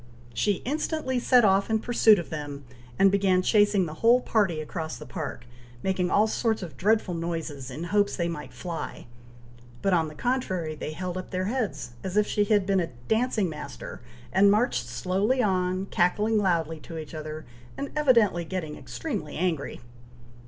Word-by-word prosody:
She 200 - 0
instantly 290 -1 -1
set 245 -1 +5
off 195 +1 +3
in 220 - +3
pursuit 220 -1 +5
of 175 - -5
them, 145 -2 -5 0.3
and 195 0 +5
began 190 -2 +3
chasing 205 -2 +4
the 155 - -6
whole 235 +2 +6
party 205 -9 +1
across 160 +1 -5
the - - -9
park, 155 -8 -6 0.4
making 185 -2 0
all 210 +3 +4
sorts 220 -1 0
of 160 -7 -8
dreadful 210 +3 +2
noises, 165 -5 -4
in 140 +6 -6
hopes 205 +3 +1
they 170 -2 -1
might 150 -3 -6
fly; 170 -3 -6 0.8
but, 195 - +2
on 165 -2 +3
the 150 - -10
contrary, 185 -9 -1
they 155 0 -5
held 180 +3 -4
up 185 - -8
their 185 0 -2
heads, 200 - -2
as 190 +1 -3
if 210 - +5
she 205 0 +1
had 205 -2 +3
been 195 0 +2
a 170 - -1 0.2
dancing 220 -3 +1
master, 150 -4 -7 0.3
and 200 +2 +6
marched 200 - +2
slowly 185 - 0
on, 185 -3 +1
cackling 210 +4 +2
loudly 165 -5 0
to 165 +2 -9
each 155 -1 -7
other, 155 0 -6 0.3
and 280 - -4
evidently 235 - +4
getting 165 -3 -4
extremely - - -5
angry. 165 -7 -2
185 Hz, 175 wpm, -27 LUFS, 160-210 Hz, 0.8 s, whole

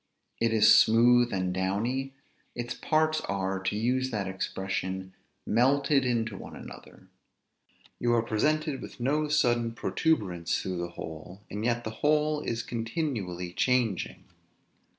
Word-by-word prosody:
It 115 -1 +2
is 110 -1 +7
smooth 120 +2 +5
and 95 -1 -1
downy; 115 +9 -1 0.4
its 120 0 -3
parts 155 0 +1
are 95 -1 -1
(to 95 +2 -2
use 125 +4 0
that 105 -5 -2
expression) 95 0 -3 0.3
melted 135 +3 +3
into 115 -4 0
one - - -9
another; - - -12 0.9
you 120 - +1
are 115 - +2
presented 145 +5 0
with - - -10
no 150 +5 +1
sudden 120 -6 +2
protuberance 100 - 0
through 95 -1 -4
the 85 0 -3
whole, 85 +5 -8
and 105 +2 -4
yet 120 0 0
the 110 - -4
whole 150 0 +2
is 115 -5 -3
continually 115 - -3
changing. 120 -6 0
115 Hz, 130 wpm, -28 LUFS, 95-130 Hz, 0.9 s, is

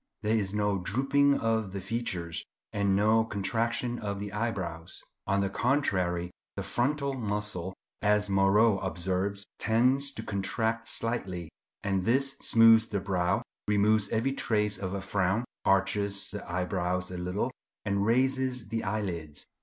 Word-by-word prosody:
There 110 +1 +2
is 100 -3 0
no 105 -1 0
drooping 135 +8 +2
of 110 -4 0
the 100 - -3
features, 95 -6 -3 0.3
and 100 -2 +2
no 110 +3 +4
contraction 115 +3 -1
of 100 -2 -3
the 100 0 -5
eyebrows. 95 -7 -4 0.2
On 100 +1 +2
the 100 - 0
contrary, 95 -10 0 0.2
the - - -3
frontal 140 +2 0
muscle, 105 -6 -3 0.3
as 105 0 +3
Moreau 100 +2 +4
observes, 95 +3 -2
tends 130 +5 +3
to 110 - -6
contract 110 +3 -1
slightly; 95 -10 -2 0.3
and 95 -2 0
this 135 +6 +1
smooths 115 0 +6
the 100 - -2
brow, 95 0 0 0.2
removes 105 0 +3
every 115 +5 +1
trace 105 -6 0
of 95 0 -3
a 100 - -3
frown, 100 +3 0 0.2
arches 100 +1 +1
the 105 -4 -7
eyebrows 90 0 -1
a 90 - -5
little, 90 +8 -1 0.3
and 100 -1 +1
raises 130 0 +1
the 115 +1 -2
eyelids. 90 -7 -3
105 Hz, 140 wpm, -29 LUFS, 95-115 Hz, 0.3 s, smooths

